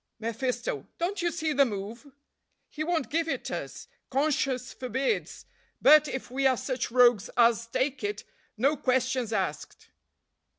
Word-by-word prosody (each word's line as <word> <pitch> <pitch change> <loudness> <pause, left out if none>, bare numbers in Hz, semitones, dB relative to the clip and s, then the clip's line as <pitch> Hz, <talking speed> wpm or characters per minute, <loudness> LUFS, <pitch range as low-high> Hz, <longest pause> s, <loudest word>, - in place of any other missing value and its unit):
mephisto. 230 - -3
"Don't 365 +4 -2
you 345 - +1
see 315 -2 -1
the 280 - +5
move? 225 +4 -5 0.6
he 310 - -5
won't 330 -3 -1
give 330 +1 0
it - - -3
us, - - -6 0.2
conscience 270 -2 0
forbids; 260 +1 -2 0.3
but, 300 +2 +7
if 265 -2 -5
we 270 +1 +2
are 260 -2 +2
such 255 -1 -3
rogues 240 -4 +4
as 230 -1 +4
take 270 - -1
it, 415 0 -3 0.3
no 275 +7 +2
questions 255 -3 0
asked." 220 - -4
260 Hz, 140 wpm, -28 LUFS, 240-300 Hz, 0.6 s, but